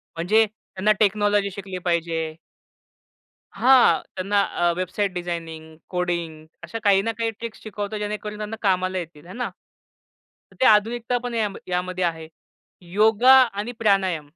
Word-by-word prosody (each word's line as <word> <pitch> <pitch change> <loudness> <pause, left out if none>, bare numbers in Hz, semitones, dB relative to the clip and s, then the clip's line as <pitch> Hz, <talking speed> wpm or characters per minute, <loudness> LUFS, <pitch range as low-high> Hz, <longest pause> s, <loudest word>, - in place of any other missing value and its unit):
म्हणजे 215 +7 +3
त्यांना 210 -1 -2
टेक्नॉलॉजी 205 -1 +2
शिकली 190 -1 -7
पाहिजे. 165 -2 -1 1.2
हां, 255 0 +5
त्यांना 200 +2 +1
अ, 175 -2 0
वेबसाईट 185 +2 -2
डिझायनिंग, 165 -3 -6
कोडिंग 170 -3 -3 0.2
अशा 210 +7 -6
काही 195 -2 +5
ना - - +2
काही 230 0 0
ट्रिक्स 225 +1 -9
शिकवतो 210 0 -5
जेणेकरून 210 0 -4
त्यांना 215 +1 -5
कामाला 185 -2 +1
येतील. 165 -3 -7
आहे 180 - -10
ना? 245 - -3 1.0
तर - - -19
ते 260 - +5
आधुनिकता 230 +3 +3
पण 245 - -4
या 225 -2 +1 0.2
यामध्ये 180 0 -2
आहे. 165 -2 -2 0.7
योगा 220 +5 +5
आणि 225 -2 -1
प्राणायाम. 185 -8 +1
195 Hz, 140 wpm, -23 LUFS, 175-215 Hz, 1.2 s, हां